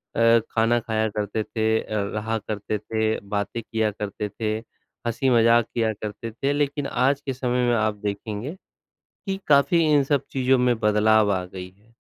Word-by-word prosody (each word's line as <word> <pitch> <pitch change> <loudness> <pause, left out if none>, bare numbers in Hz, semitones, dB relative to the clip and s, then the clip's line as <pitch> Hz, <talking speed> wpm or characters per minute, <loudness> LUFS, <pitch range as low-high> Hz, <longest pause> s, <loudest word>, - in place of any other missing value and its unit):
अ, 115 0 +5
खाना 115 +1 +2
खाया 110 -1 -1
करते 105 +1 -2
थे 110 0 0
अ, 105 -1 -3
रहा 110 +1 -1
करते 105 0 -4
थे, 110 +1 -1
बातें 105 +3 -2
किया 110 -1 -1
करते 105 0 -4
थे, 110 0 -3 0.6
हँसी 130 +3 0
मज़ाक 115 -1 +5
किया 115 -2 +1
करते 105 +2 -6
थे, 135 +5 -1
लेकिन 145 -1 -1
आज 135 +3 +1
के 135 - -2
समय 125 -1 0
में 120 - +3
आप 110 -1 +1
देखेंगे 105 - -4 0.7
कि 195 -1 -2
काफ़ी 140 +3 +4
इन 145 -2 +5
सब 140 -1 +1
चीज़ों 130 0 +2
में 125 -1 +2
बदलाव 105 -1 +3
आ 95 -1 0
गई 90 0 -8
है। 105 +5 -28
115 Hz, 175 wpm, -24 LUFS, 105-125 Hz, 0.7 s, अ